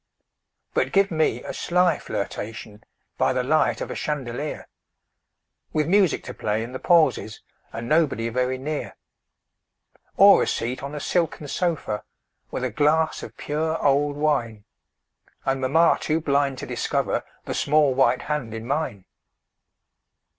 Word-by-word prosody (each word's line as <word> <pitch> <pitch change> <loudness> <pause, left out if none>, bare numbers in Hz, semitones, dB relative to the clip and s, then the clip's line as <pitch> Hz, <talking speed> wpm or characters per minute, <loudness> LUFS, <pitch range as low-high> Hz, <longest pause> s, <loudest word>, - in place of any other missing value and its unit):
But - - +1
give 195 -1 +3
me 160 -1 +1
a - - -6
sly 180 0 +2
flirtation 105 +1 -6 0.4
By - - +3
the 130 -1 0
light 155 +5 +2
of - - -4
a - - -4
chandelier 145 0 -4 1.1
With 155 -1 +1
music 190 -2 +3
to 125 - -7
play 110 0 -1
in 120 - -7
the 130 - -6
pauses, 160 -10 +2 0.3
And 115 +1 -6
nobody 145 -6 +2
very 125 +2 0
near; 150 +3 -4 1.2
Or - - +8
a - - +1
seat 120 +3 -2
on 140 +2 -6
a - - -3
silken 165 -1 -1
sofa, 160 - -2 0.5
With 130 - -4
a 130 - -1
glass 155 +6 +2
of - - -10
pure 160 +2 -1
old 145 +1 +2
wine, 120 -9 0 0.8
And 135 0 0
mamma 160 +6 +4
too 155 +1 0
blind 140 -3 +1
to - - -6
discover - - -1 0.2
The - - -3
small 150 -2 +3
white 125 -1 +2
hand 140 -7 -3
in 110 0 -6
mine. 130 -8 -2
140 Hz, 145 wpm, -24 LUFS, 125-155 Hz, 1.2 s, Or